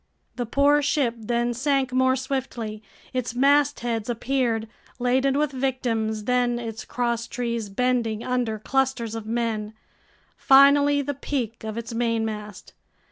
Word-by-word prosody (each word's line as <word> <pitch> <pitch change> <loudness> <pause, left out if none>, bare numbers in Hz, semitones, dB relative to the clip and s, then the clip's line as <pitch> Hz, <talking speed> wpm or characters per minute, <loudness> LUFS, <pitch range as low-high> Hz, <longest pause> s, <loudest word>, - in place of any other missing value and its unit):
The 245 -2 -3
poor 285 +4 +4
ship 285 -4 +1
then 240 +1 -1
sank 265 +1 0
more 260 0 +3
swiftly. 255 -5 -4 0.3
Its 250 -2 -2
mastheads 260 -4 +2
appeared, 240 -2 0 0.3
laden 260 +2 +2
with 300 -1 +1
victims, 240 -5 -1
then 245 +1 +1
its 225 -2 -6
crosstrees 235 -2 -2
bending 230 0 0
under 245 -3 -1
clusters 260 -1 -1
of 225 -1 -6
men, 220 -2 -2 0.6
finally 280 +1 +5
the 285 +1 -2
peak 250 -5 -4
of 220 0 -5
its 235 0 -5
mainmast. 220 -3 -3
240 Hz, 125 wpm, -24 LUFS, 225-265 Hz, 0.6 s, finally